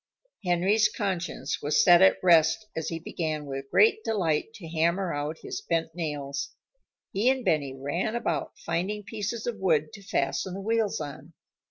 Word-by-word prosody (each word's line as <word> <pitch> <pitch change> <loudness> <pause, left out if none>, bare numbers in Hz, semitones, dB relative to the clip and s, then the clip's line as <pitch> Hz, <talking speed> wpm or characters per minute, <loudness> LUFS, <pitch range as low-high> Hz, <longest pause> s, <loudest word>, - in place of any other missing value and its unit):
Henry's 190 +4 +3
conscience 185 -4 -3
was 145 - +3
set 175 -1 +7
at 190 - +6
rest 170 +4 +5
as 160 - -2
he 165 - -3
began 155 -2 -3
with 135 -1 -6
great 440 0 +4
delight 180 -4 0
to 175 -6 -9
hammer 170 +3 0
out 145 +2 -3
his - - -5
bent 165 -1 -1
nails. 145 -4 -4 0.6
He 210 +6 +3
and 260 -2 0
Benny 140 -4 +1
ran 170 - -2
about 235 - -2
finding 205 +5 -2
pieces 215 +2 -4
of 240 -2 -3
wood 155 -5 +1
to 210 - -10
fasten 180 0 -1
the 195 - -5
wheels 225 0 0
on. 150 +1 -8
170 Hz, 165 wpm, -27 LUFS, 155-205 Hz, 0.6 s, set